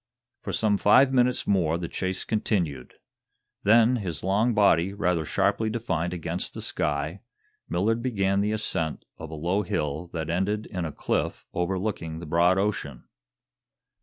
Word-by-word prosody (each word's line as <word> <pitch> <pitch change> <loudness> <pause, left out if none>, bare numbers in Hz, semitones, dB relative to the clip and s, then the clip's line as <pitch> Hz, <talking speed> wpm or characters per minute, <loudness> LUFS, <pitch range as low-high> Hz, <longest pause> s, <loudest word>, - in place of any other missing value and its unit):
For - - -5
some 105 -2 +1
five 130 +6 +5
minutes 125 -1 +2
more 85 -5 +2
the 85 -1 -4
chase 95 +2 -3
continued. 90 - -2 0.7
Then, 115 +4 +5
his 85 -9 -4
long 105 +5 +2
body 100 -3 +4
rather 90 -5 0
sharply 110 +7 +1
defined 95 -7 -2
against 85 0 -4
the - - -5
sky, 75 +5 -2 0.5
Millard 110 +7 +1
began 100 -5 +1
the 105 +1 0
ascent 80 -7 -2
of 80 - -7
a 80 - -7
low 90 +6 0
hill 80 -2 -3
that 80 -2 -4
ended 105 +5 0
in 90 -4 -4
a 80 - -4
cliff - - -2
overlooking 90 -2 -2
the 85 - -7
broad 85 +4 +3
ocean. 95 -10 -2
95 Hz, 150 wpm, -26 LUFS, 80-105 Hz, 0.7 s, five